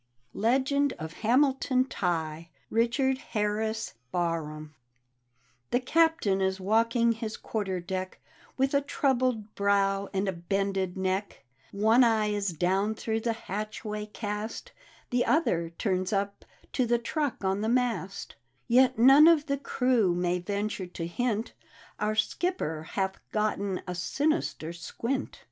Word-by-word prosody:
LEGEND 265 Hz, +5 st, +2 dB
OF 160 Hz, +1 st, -7 dB
HAMILTON 260 Hz, +2 st, +2 dB
TIGHE: 165 Hz, -7 st, -2 dB, 0.2 s
richard 260 Hz, +4 st, +2 dB
kar 210 Hz, -1 st, +1 dB
ris 220 Hz, 0 st, -2 dB, 0.2 s
BARHAM 155 Hz, -3 st, -2 dB, 1.0 s
The 245 Hz, -, +2 dB
Captain 260 Hz, -8 st, +2 dB
is 190 Hz, 0 st, 0 dB
walking 230 Hz, +4 st, +2 dB
his 225 Hz, -1 st, -4 dB
quarter 195 Hz, -4 st, -3 dB
deck, 185 Hz, +1 st, -5 dB, 0.4 s
With 270 Hz, +1 st, +1 dB
a 280 Hz, -, +4 dB
troubled 255 Hz, -6 st, 0 dB
brow 200 Hz, 0 st, +1 dB
and 195 Hz, 0 st, -1 dB
a -, -, +2 dB
bended 190 Hz, +1 st, -2 dB
neck; 190 Hz, +2 st, -2 dB, 0.3 s
One 220 Hz, +5 st, +4 dB
eye 220 Hz, -3 st, +3 dB
is 205 Hz, -1 st, 0 dB
down 190 Hz, +6 st, +1 dB
through 220 Hz, 0 st, -2 dB
the 230 Hz, +1 st, -1 dB
hatchway 210 Hz, +1 st, -4 dB
cast, 210 Hz, +1 st, -5 dB, 0.4 s
The 245 Hz, 0 st, +2 dB
other 170 Hz, -, +1 dB
turns 185 Hz, +1 st, -1 dB
up 200 Hz, 0 st, -2 dB, 0.3 s
to 255 Hz, -3 st, +1 dB
the 240 Hz, +1 st, +3 dB
truck 280 Hz, +1 st, -2 dB
on 190 Hz, +1 st, 0 dB
the 220 Hz, -, 0 dB
mast; 235 Hz, -6 st, -1 dB, 0.3 s
Yet 255 Hz, +1 st, +4 dB
none 270 Hz, +6 st, +8 dB
of 325 Hz, -3 st, +5 dB
the 280 Hz, -3 st, -1 dB
crew 250 Hz, -9 st, +2 dB
may 180 Hz, 0 st, 0 dB
venture 200 Hz, +1 st, -3 dB
to 170 Hz, -1 st, -5 dB
hint 225 Hz, +5 st, -2 dB, 0.2 s
" 230 Hz, 0 st, -24 dB
Our 210 Hz, 0 st, 0 dB
skipper 215 Hz, -, -1 dB
hath 190 Hz, -1 st, -1 dB
gotten 205 Hz, -3 st, -1 dB
a 180 Hz, -, -3 dB
sinister 185 Hz, -, -1 dB
squint! 235 Hz, +10 st, -4 dB
210 Hz, 135 wpm, -28 LUFS, 190-245 Hz, 1.0 s, none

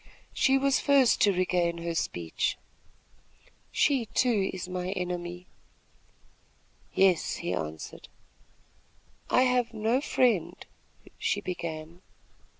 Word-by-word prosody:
She 270 Hz, -1 st, +3 dB
was 275 Hz, 0 st, +2 dB
first 275 Hz, -4 st, +4 dB
to 205 Hz, -, +6 dB
regain 180 Hz, -2 st, 0 dB
her 170 Hz, 0 st, -3 dB
speech. 85 Hz, -, -2 dB, 1.1 s
"She, 265 Hz, -6 st, +2 dB
too, 225 Hz, -7 st, +1 dB
is 185 Hz, -1 st, -6 dB
my 180 Hz, 0 st, -3 dB
enemy." 175 Hz, -1 st, -4 dB, 1.5 s
"Yes," 185 Hz, -4 st, +3 dB
he 90 Hz, -, -3 dB
answered. 80 Hz, -2 st, -6 dB, 1.2 s
"I 255 Hz, -, +4 dB
have 250 Hz, -2 st, +1 dB
no 225 Hz, +5 st, +1 dB
friend 245 Hz, -, +1 dB, 0.4 s
" -, -, -35 dB
she -, -, 0 dB
began. 170 Hz, -1 st, -6 dB
185 Hz, 105 wpm, -28 LUFS, 170-245 Hz, 1.5 s, to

